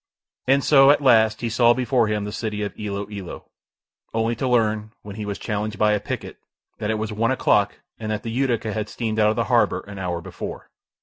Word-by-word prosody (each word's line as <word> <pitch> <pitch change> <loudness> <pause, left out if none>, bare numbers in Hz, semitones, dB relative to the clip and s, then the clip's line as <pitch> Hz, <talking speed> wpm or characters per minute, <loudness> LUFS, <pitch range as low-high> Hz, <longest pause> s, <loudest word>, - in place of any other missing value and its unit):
And 135 +1 +4
so, 135 -2 +6
at 145 0 +4
last, 110 -4 +4
he 120 - -1
saw 120 +1 +4
before 125 -2 +1
him 105 -1 -1
the 105 - -5
city 105 -1 -3
of 100 - -4
Ilo 100 -1 -4
Ilo, 100 -4 -7 0.7
only 115 +1 +1
to 130 - -1
learn, 110 -3 +1
when 100 -1 -8
he 105 -1 -5
was 100 - -3
challenged 105 -1 -3
by 105 +1 +3
a 105 - +2
picket, - - -6 0.4
that 105 - -2
it 110 - +1
was 110 0 -3
one 115 +2 +1
o'clock 105 -6 +2 0.2
and 110 -1 -4
that 105 - -3
the 115 - -4
Utica 120 -3 0
had 110 0 -3
steamed 110 -2 -3
out 105 0 +5
of 110 - 0
the - - +1
harbour - - +2
an 100 -1 -10
hour 90 -2 -2
before. 90 +2 -8
110 Hz, 225 wpm, -23 LUFS, 105-115 Hz, 0.7 s, so